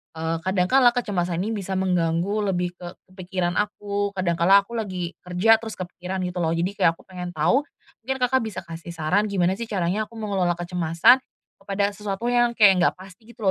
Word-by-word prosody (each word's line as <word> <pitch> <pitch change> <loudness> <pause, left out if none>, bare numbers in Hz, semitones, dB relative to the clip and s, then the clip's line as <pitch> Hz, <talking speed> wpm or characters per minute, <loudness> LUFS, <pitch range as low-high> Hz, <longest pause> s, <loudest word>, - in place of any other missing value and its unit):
eee, 160 +1 -2
kadang 185 +2 0
kala 255 -2 +5
kecemasan 180 -8 -1
ini 220 - -2
bisa 195 -3 -3
mengganggu 185 +2 0
lebih 180 0 -1
ke 175 0 -8
ke - - -32
pikiran 180 -1 -1
aku. 205 -1 -2
Kadang 175 -3 -1
kala 195 +4 +6
aku 200 - -20
lagi 185 -5 -4
kerja 190 +5 +3
terus 220 -1 -7
kepikiran 185 +1 -5
gitu 180 0 -3
lho. 165 -1 0
Jadi 175 +3 -1
kayak 165 - +4
aku - - -20
pengen 180 -1 -7
tahu, 265 - +3 0.4
mungkin 265 +3 -2
Kakak 260 +1 +3
bisa 220 -5 -5
kasih 170 +1 -9
saran 180 +7 +1
gimana 185 -3 +1
sih 235 - -4
caranya 200 +1 -1
aku 230 - -17
mengelola 195 -5 -1
kecemasan 175 +5 +3 0.4
kepada 200 +1 -1
sesuatu 205 +1 -5
yang 240 -1 +2
kayak 195 -5 +6
enggak 175 - +2
pasti 190 +3 -15
gitu 220 - -11
190 Hz, 195 wpm, -24 LUFS, 175-210 Hz, 0.4 s, kala